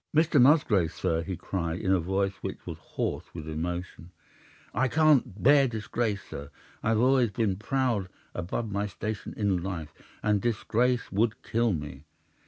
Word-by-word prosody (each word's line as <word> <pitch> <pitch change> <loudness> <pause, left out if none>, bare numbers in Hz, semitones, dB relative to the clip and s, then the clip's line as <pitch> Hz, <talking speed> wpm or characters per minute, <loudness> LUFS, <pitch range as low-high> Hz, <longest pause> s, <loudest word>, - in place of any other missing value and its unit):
"'"Mr. 160 -3 +5
Musgrave, 120 - +4
sir," 80 0 -1
he 90 +1 -4
cried, 85 -2 -3
in 95 - 0
a 95 - +4
voice 95 +3 0
which - - -6
was - - -6
hoarse - - -3
with 80 -2 -6
emotion, 85 +2 -4 0.6
"I 130 - +2
can't 140 - +3
bear 140 0 +6
disgrace, 110 -2 -2
sir. 70 0 -8 0.3
I've 110 0 +2
always 125 -1 +4
been 100 -2 0
proud 115 -4 0 0.2
above 100 +5 -3
my 100 +1 -1
station 105 +2 -5
in 100 -4 +1
life, 85 -5 -5 0.3
and 105 -1 +2
disgrace 120 +2 0
would 105 +2 0
kill 115 0 +1
me. 75 -4 -5
105 Hz, 155 wpm, -28 LUFS, 90-120 Hz, 0.6 s, bear